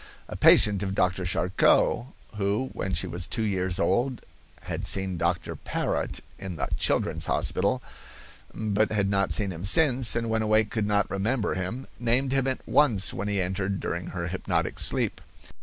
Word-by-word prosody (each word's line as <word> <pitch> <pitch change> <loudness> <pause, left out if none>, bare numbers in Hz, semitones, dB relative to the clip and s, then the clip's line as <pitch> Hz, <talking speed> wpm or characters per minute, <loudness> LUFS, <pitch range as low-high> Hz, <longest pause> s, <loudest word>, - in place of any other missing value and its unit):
A - - -7
patient 100 -2 +5
of 95 -1 -3
Dr. 90 0 0
Charcot, 90 +6 +2 0.3
who 105 +6 -1
when 95 -1 -3
she 95 - 0
was 90 0 -2
two 110 -2 -1
years 95 -3 -1
old 125 +5 0 0.4
had - - -5
seen 95 -1 0
Dr. 85 0 -1
Parrot - - -3 0.2
in 95 -2 -6
the - - -3
children's 80 +1 0
hospital, - - +1 0.7
but 110 0 -1
had 100 -2 0
not 100 0 +1
seen 100 -3 +1
him 85 0 -8
since, 125 +2 +4
and 115 0 -1
when 110 0 0
awake 110 0 +2
could 110 -3 -1
not 105 0 +1
remember 105 +4 -1
him, 95 +8 -4
named 125 +3 +1
him 135 -1 +1
at 130 - -3
once 120 -10 +3
when 100 - -4
he 100 -1 0
entered 95 +1 -2
during 85 +1 -4
her 85 -2 -4
hypnotic 95 - -2
sleep. - - 0
100 Hz, 170 wpm, -26 LUFS, 95-115 Hz, 0.7 s, patient